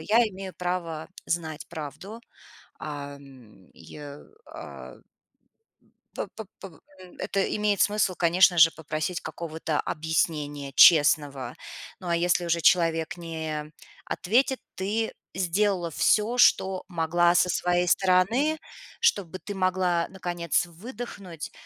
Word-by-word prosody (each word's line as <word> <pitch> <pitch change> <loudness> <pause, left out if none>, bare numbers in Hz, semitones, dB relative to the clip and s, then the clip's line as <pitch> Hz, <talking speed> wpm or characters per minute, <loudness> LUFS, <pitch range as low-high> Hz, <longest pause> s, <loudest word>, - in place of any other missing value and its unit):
я 210 +8 +2
имею 190 -2 -8
право 175 -3 -3 0.2
знать 160 -3 -3
правду". 170 +8 -8 0.6
Ам, 140 -8 -10
и, - - -17
я 145 -1 -9 0.3
а. - - -10 1.2
П - - -3
п 220 - -7
побо 185 -5 -11 0.2
м, 180 -1 -14
это 195 0 0
имеет 210 -2 +1
смысл, 205 -3 +2
конечно 175 +1 +4
же, 165 0 +8
попросить 155 +2 -4
какого-то 160 -2 -4
объяснения 150 -3 -2
честного. 145 -6 +5 0.4
Ну, 185 - -8
а 170 - +2
если 175 +1 +1
уже 170 0 +1
человек 165 -1 +2
не 160 -3 -5 0.3
ответит, 255 +7 +1 0.2
ты 210 +4 -2 0.2
сделала 185 -1 0
всё, 220 +9 +2
что 190 -5 +4
могла 175 0 +2
со 180 +1 +4
своей 175 0 +1
стороны, 195 - +3 0.4
чтобы 190 - +1
ты 205 - -7
могла 185 -2 +1
наконец 175 -3 -1
выдохнуть 190 - -8
175 Hz, 115 wpm, -26 LUFS, 160-190 Hz, 1.2 s, же